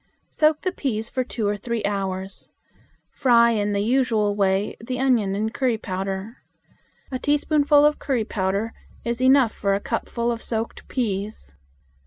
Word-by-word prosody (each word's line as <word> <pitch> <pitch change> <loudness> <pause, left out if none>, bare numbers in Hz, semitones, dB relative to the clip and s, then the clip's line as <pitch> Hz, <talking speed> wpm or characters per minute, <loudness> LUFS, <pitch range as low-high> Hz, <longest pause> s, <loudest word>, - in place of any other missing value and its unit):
Soak 305 0 +2
the 370 - -1
peas 230 -10 -2
for 255 - 0
two 225 -4 -3
or 205 - +1
three 230 +2 -3
hours. 195 -1 -3 0.6
Fry 235 -2 +4
in 205 -2 0
the 200 0 0
usual 220 -3 +2
way 195 0 +1
the 250 +2 -3
onion 235 -7 +2
and 220 +2 -2
curry 250 -4 +1
powder. 195 +3 -4 0.7
A 255 - -2
teaspoonful 290 +1 +3
of 300 0 +2
curry 250 -6 -1
powder 200 +2 -1 0.3
is 235 +1 -2
enough 260 -3 +5
for 200 -1 0
a - - -1
cupful 235 +2 -2
of 230 -1 -4
soaked 225 0 -4
peas. 205 - -3
225 Hz, 155 wpm, -23 LUFS, 205-255 Hz, 0.7 s, enough